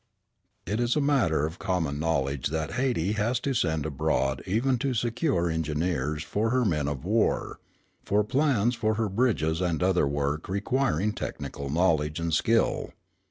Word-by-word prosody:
It 105 +5 -2
is 120 0 +1
a - - +2
matter 115 - +2
of 80 +3 -6
common 80 -6 -1
knowledge 70 -4 0
that 80 +1 -3
Hayti 120 -8 0
has 115 +3 +1
to 140 - -1
send 80 - 0
abroad 65 -2 0
even 120 +6 +1
to 135 -1 -1
secure 120 - 0
engineers 80 -2 -1
for 105 +8 -1
her 125 0 +2
men 75 -7 0
of 75 0 -4
war, 110 +3 0 0.4
for 105 +2 +2
plans 125 -1 +2
for 110 -2 0
her 110 -1 0
bridges 95 -7 +1
and 90 -2 0
other 90 -5 +3
work 70 +3 -2
requiring 105 - 0
technical 70 -8 -5
knowledge 80 -1 +1
and 85 -1 -2
skill. 115 +8 +1
90 Hz, 160 wpm, -27 LUFS, 75-115 Hz, 0.4 s, other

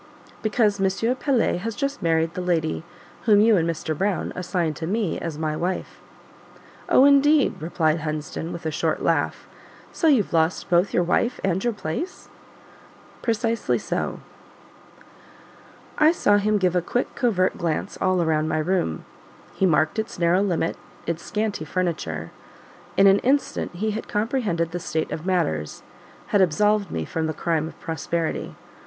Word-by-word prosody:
"Because 210 -2 +1
M. 195 +6 +1
Pelet 255 -10 +1
has 225 +3 -4
just 275 +3 -2
married 165 -1 +1
the 180 - -4
lady 165 -3 0 0.4
whom 210 -3 +6
you 220 +1 +5
and 170 -2 +1
Mr. 160 -1 -3
Brown 195 +2 -1
assigned 175 -3 -1
to 160 - -4
me 210 -1 -1
as 165 -3 -5
my 155 -1 -1
wife." 180 +4 -3 0.9
"Oh, 260 - +6
indeed!" 285 - +4
replied 160 -1 +1
Hunsden 155 +1 -4
with 170 -1 -7
a 160 - 0
short - - -1
laugh; - - 0 0.4
"so 325 - 0
you've 255 - +3
lost 165 +3 +1
both 175 +3 +3
your 175 - +2
wife 235 +8 +1
and 190 0 0
your 240 - +2
place?" 210 - -5 0.9
"Precisely 230 0 0
so." - - -3 1.8
I 310 +1 +6
saw 205 -11 +3
him 210 +1 +2
give 185 -2 +1
a 180 - +3
quick, 245 +8 -2
covert 200 -8 +1
glance 165 -3 -2
all 185 -2 +2
round 155 -1 +1
my - - 0
room; 155 - -1 0.5
he 190 - +2
marked 155 +3 +2
its 220 - -4
narrow 170 +2 +3
limits, 175 -4 -1 0.3
its 170 0 -2
scanty 210 -5 -2
furniture: 155 - -3 0.7
in 195 - +6
an 195 0 +6
instant 270 -8 0
he 215 +4 -1
had 215 +2 -5
comprehended 210 -7 -1
the 175 - -3
state 160 -1 -2
of 160 +3 -5
matters 80 - -1 0.5
had 205 - +3
absolved 205 +4 +2
me 80 -1 -3
from 160 - -2
the 155 - -3
crime 160 -1 0
of - - -12
prosperity. 165 0 -3
180 Hz, 160 wpm, -24 LUFS, 160-215 Hz, 1.8 s, whom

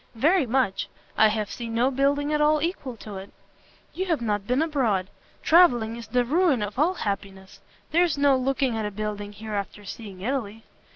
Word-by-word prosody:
"Very 305 +5 +3
much; 240 -5 0 0.3
I 220 - +6
have 215 -1 -2
seen 230 -2 -5
no 250 +3 +2
building 285 +2 +1
at 300 - +1
all 305 +1 +4
equal 295 -7 -3
to 205 -2 -8
it." 190 +1 -9 0.6
"You 375 +1 -3
have 330 -4 +1
not 205 -3 -2
been 255 +5 +2
abroad. 230 - 0 0.3
Travelling 245 -10 +5
is 235 -1 -9
the 245 -1 +1
ruin 300 - +2
of 205 +4 -5
all 345 +5 +3
happiness! 195 - -5 0.3
There's 340 -2 +3
no 280 -1 +4
looking 265 -1 0
at 220 - -2
a - - -3
building 205 0 -5
here 215 +1 -8
after 205 0 -4
seeing 200 -3 -9
Italy." 225 -2 -3
240 Hz, 185 wpm, -25 LUFS, 210-285 Hz, 0.6 s, I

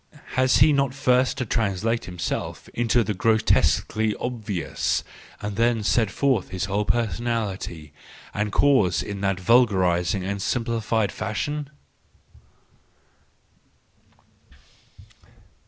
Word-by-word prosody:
Has 130 0 +3
he 150 +3 +6
not 140 -2 +1
first 125 -1 +2
to 130 - -2
translate 110 +1 -1
himself 90 -2 -4
into 120 0 +1
the 105 - -2
grotesquely 110 0 +2
obvious, 110 -8 -2 0.4
and 105 -1 -4
then 115 -1 +2
set 110 +1 +2
forth 125 -2 0
his 95 +1 -3
whole 100 +2 -1
personality 110 -10 -2 0.4
and 105 0 -2
cause 130 -10 +3
in 100 -1 -6
that 95 -2 0
vulgarised 95 -5 +3
and 100 +1 -3
simplified 115 -2 -1
fashion 145 +7 -3
110 Hz, 100 wpm, -24 LUFS, 95-120 Hz, 0.4 s, he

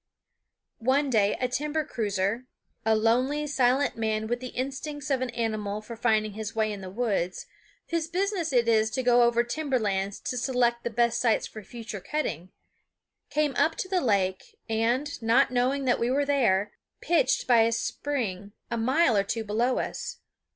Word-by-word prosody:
One 265 +4 +2
day 205 -3 +3
a 255 - +1
timber 300 +4 -1
cruiser 210 +2 -2 0.4
a 220 0 +3
lonely, 250 +7 +2
silent 270 -1 +2
man 220 -1 -1
with 240 +2 -2
the 255 - -6
instincts 275 +3 -4
of 265 -2 +1
an 255 - -1
animal 215 -3 -2
for 215 +2 -9
finding 215 -2 +1
his 220 +1 -6
way 220 -1 +1
in 200 - -7
the 190 - -7
woods, 195 -4 -1 0.5
whose 335 -1 0
business 365 -1 -1
it 240 -3 +3
is 220 -1 +3
to 255 +4 -2
go 245 0 +5
over 235 0 +4
timber 275 +2 -1
lands 200 -3 -1
to 250 - -3
select 240 -2 +1
the - - -1
best 235 0 +1
sites 230 -3 +2
for 215 - -9
future 220 -1 -8
cutting 185 - -3 0.8
came 300 -2 +1
up 320 - +3
to - - -4
the 370 -1 +1
lake 190 -5 0
and, 235 +6 0
not 230 +5 +3
knowing 255 +3 +1
that 245 - +2
we 235 - +1
were 280 +2 +1
there, 210 -8 +2 0.3
pitched 320 -6 +2
by 240 -2 +5
a 225 +1 +3
spring 220 -6 -3 0.2
a 235 - 0
mile 255 +3 +3
or 200 - +3
two 225 +3 -3
below 230 +4 0
us. - - -4
240 Hz, 180 wpm, -27 LUFS, 215-270 Hz, 0.8 s, go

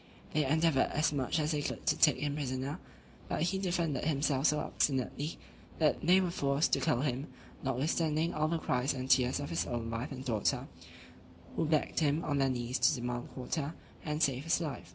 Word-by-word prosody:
They 155 - +3
endeavoured 155 0 +3
as 150 0 +2
much 135 +1 0
as 155 0 +1
they 150 -2 0
could - - -4
to - - +3
take 150 - +5
him 145 -1 -2
prisoner, 135 0 -3 0.5
but - - 0
he 190 +3 0
defended 170 -7 -1
himself 145 -2 +2
so 150 +1 +2
obstinately, 145 +2 -1 0.4
that 155 -2 +2
they 180 +3 +6
were 180 -2 0
forced 140 -1 +1
to - - +4
kill 150 -7 +1
him, 135 0 -1 0.3
notwithstanding 155 +4 0
all 155 0 +1
the 165 +1 0
cries 130 -3 0
and 130 0 -4
tears 130 0 +3
of 145 - -5
his 165 - -1
own 115 -1 -3
wife 115 +6 -3
and 130 -1 -7
daughter, 110 -6 0 0.9
who - - +1
begged 155 -1 +1
him, 155 0 +1
on 145 -2 0
their 135 -1 +3
knees, 125 0 -2
to 125 - +4
demand 120 0 -4
quarter, 145 +4 -3 0.3
and 150 +1 -1
save 135 +1 +1
his 165 +1 +2
life. 155 -5 -5
145 Hz, 195 wpm, -32 LUFS, 130-155 Hz, 0.9 s, they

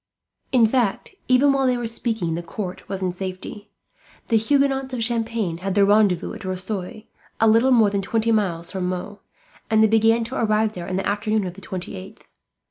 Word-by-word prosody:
In 245 -3 +5
fact, 230 - 0
even 265 +2 +4
while 270 -1 +1
they 250 -1 +2
were 240 - -3
speaking, 225 -6 -2
the 170 - -3
court 180 +2 -7
was 190 -1 -4
in 185 - 0
safety. 190 +3 -7 0.6
The 230 - +4
Huguenots 270 +2 +1
of 235 - -2
Champagne 225 -6 -2
had 195 +1 -3
their 200 -1 +5
rendezvous 205 -4 +2
at - - -9
Rosoy, 190 +3 -5 0.3
a 225 - +4
little 230 +4 +4
more 225 -5 +5
than 200 -1 0
twenty 225 +3 0
miles 175 -6 0
from 185 -2 -2
Meaux, 185 +3 -5 0.5
and 220 0 +4
they - - +6
began 225 +1 +3
to 255 +4 -4
arrive 215 -1 +1
there 175 -3 -7
in 185 - -3
the 190 - -2
afternoon 210 0 0
of 180 - -5
the 195 - -13
28th. 190 +2 -8
215 Hz, 195 wpm, -22 LUFS, 185-230 Hz, 0.6 s, they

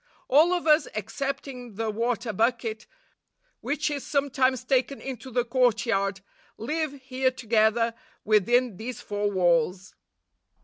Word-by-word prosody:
All 310 +6 +5
of 355 -2 0
us, 305 -2 +4
excepting 250 +1 -5
the 220 +1 -2
water 230 0 -2
bucket, 225 0 -1 0.7
which 295 +1 -1
is 285 -2 -3
sometimes 265 -3 +1
taken 260 +1 0
into 260 -1 -7
the 245 -1 0
courtyard, 230 -5 +1 0.4
live 305 +5 -2
here 260 0 0
together 230 -2 +1 0.3
within 220 +1 +3
these 235 +2 -6
four 205 0 -2
walls. 180 0 +1
240 Hz, 120 wpm, -26 LUFS, 215-265 Hz, 0.7 s, All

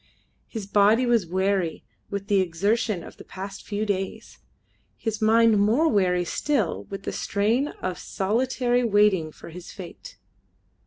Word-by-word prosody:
His 220 -4 -6
body 210 +5 +4
was 235 -7 +2
weary 190 -1 0 0.3
with 200 -1 -4
the 200 -1 +3
exertion 195 +2 0
of - - -12
the - - -11
past 195 +1 -8
few 205 +1 -2
days, 195 -2 -4 0.6
his 225 -1 -3
mind 225 0 +5
more 230 +11 +3
weary 180 - +2
still 190 - -1
with 195 0 -7
the - - -3
strain 220 +8 +1 0.2
of 185 -1 -2
solitary 245 +4 0
waiting 205 -7 +3
for - - -12
his 175 +1 -10
fate. 195 - -10
205 Hz, 145 wpm, -25 LUFS, 185-225 Hz, 0.6 s, mind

